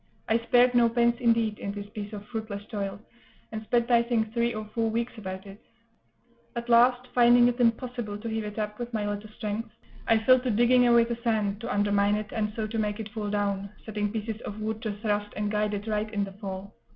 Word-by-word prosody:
I 225 +1 +3
spared 245 +2 +4
no 240 -1 +5
pains, 235 0 +2
indeed, 230 -3 +2
in 200 - -4
this 205 0 -6
piece 210 -2 -6
of 210 -1 -7
fruitless 220 -3 -5
toil, 200 -2 -3 0.5
and 220 -1 -4
spent, 235 +2 +1
I 235 -1 +6
think, 225 -2 -1
three 235 0 +1
or 215 -1 -5
four 225 -1 +1
weeks 235 +2 -2
about 190 -3 -6
it; 195 +1 -12 0.9
at 235 0 -4
last, 245 +1 +5
finding 240 0 +6
it 245 +1 -1
impossible 235 -2 0
to 220 +2 -7
heave 220 -1 -2
it 210 +1 -7
up 210 0 -3
with 240 0 -4
my 210 -1 -1
little 205 +1 -4
strength, 215 +1 -4 0.4
I 225 - +5
fell 255 +4 +5
to 250 0 -2
digging 240 +2 +4
away 235 -1 +6
the 235 0 -3
sand, 215 -3 0
to 235 +1 -4
undermine 205 -1 +2
it, 215 0 -4
and 210 -1 -1
so 220 - -2
to 225 +1 -3
make 210 0 -1
it 220 -1 -5
fall 210 -1 -4
down, 200 -1 -1 0.2
setting 210 -1 -2
pieces 220 0 -4
of 210 +1 -6
wood 220 +1 -3
to 215 -2 -2
thrust 205 0 -2
and 210 0 -1
guide 210 0 0
it 205 +1 -5
right 215 -1 -1
in 205 -2 0
the 195 - -5
fall. 195 0 -7
220 Hz, 225 wpm, -27 LUFS, 205-235 Hz, 0.9 s, I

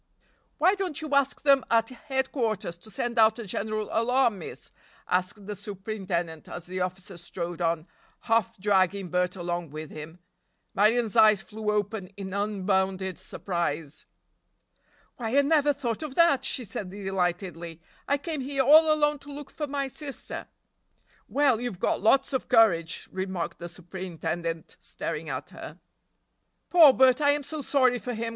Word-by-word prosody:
"Why 365 +5 +4
don't 385 -7 -3
you 310 -2 -5
ask 280 -1 +2
them 275 -2 +5
at 225 -1 +3
headquarters 255 -7 -2
to 175 +6 -14
send 235 +3 -2
out 220 0 +5
a 235 - -6
general 215 +2 -3
alarm, 235 -2 +2
miss?" 165 - -9 0.4
asked 185 +3 -1
the 210 - -4
superintendent 190 -5 -4
as 175 - -7
the 185 +1 -5
officer 185 0 -4
strode 175 0 -5
on, 165 -1 0 0.4
half 230 0 +1
dragging 190 -1 +1
Bert 180 +1 +1
along 175 -2 -3
with 155 +1 -8
him. 155 +2 -9 0.6
Marion's 225 +2 +2
eyes 215 -3 +6
flew 215 0 -5
open 210 -1 -1
in 190 -2 -6
unbounded 190 -2 -1
surprise. 165 -5 -4 1.1
"Why, 235 +2 -1
I - - +7
never 295 0 +3
thought 255 -5 -3
of 300 -4 -6
that," 335 -6 +4
she 250 - 0
said 200 -2 -5
delightedly, 180 -3 -3 0.3
"I 285 - +2
came 305 0 -4
here 270 +1 0
all 310 +4 +7
alone 295 -1 +2
to 285 +1 -12
look 285 -1 -8
for 300 - -4
my 280 0 -2
sister!" 275 +1 -6 0.8
"Well, 270 -5 +2
you've 240 -7 -4
got - - 0
lots 270 +6 +3
of 260 - -2
courage," 190 -9 +3
remarked 190 -2 -4
the 175 - -6
superintendent, 170 -2 -5
staring - - -4
at - - -5
her. - - -10 0.9
"Poor 330 -5 +9
Bert! 260 +1 +4
I 285 -1 +5
am 290 0 -2
so 295 +2 -5
sorry 255 -3 +2
for 245 +1 -4
him!" 230 +1 -3
215 Hz, 155 wpm, -27 LUFS, 180-265 Hz, 1.1 s, Poor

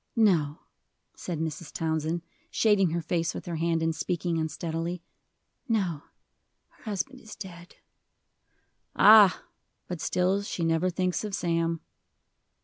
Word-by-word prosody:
"No," 170 -9 +2 0.5
said 170 -4 -5
Mrs. 160 0 -4
Townsend, 160 +1 -1 0.3
shading 205 -5 +3
her 170 +1 -2
face 165 0 -1
with - - -6
her 170 -2 -3
hand, 165 0 0
and 165 0 0
speaking 170 0 -1
unsteadily; 165 +2 -3 0.7
"no, 185 -9 0 0.7
her - - -25
husband 215 +5 -3
is 220 - -11
dead." 175 -4 -10 1.2
"Ah! 210 -3 +7 0.4
but 175 -3 -5
still 185 +2 +1
she 180 -4 -3
never 165 +2 +2
thinks 185 +1 -1
of 210 -2 -3
Sam." 165 -1 0
170 Hz, 125 wpm, -28 LUFS, 165-190 Hz, 1.2 s, Ah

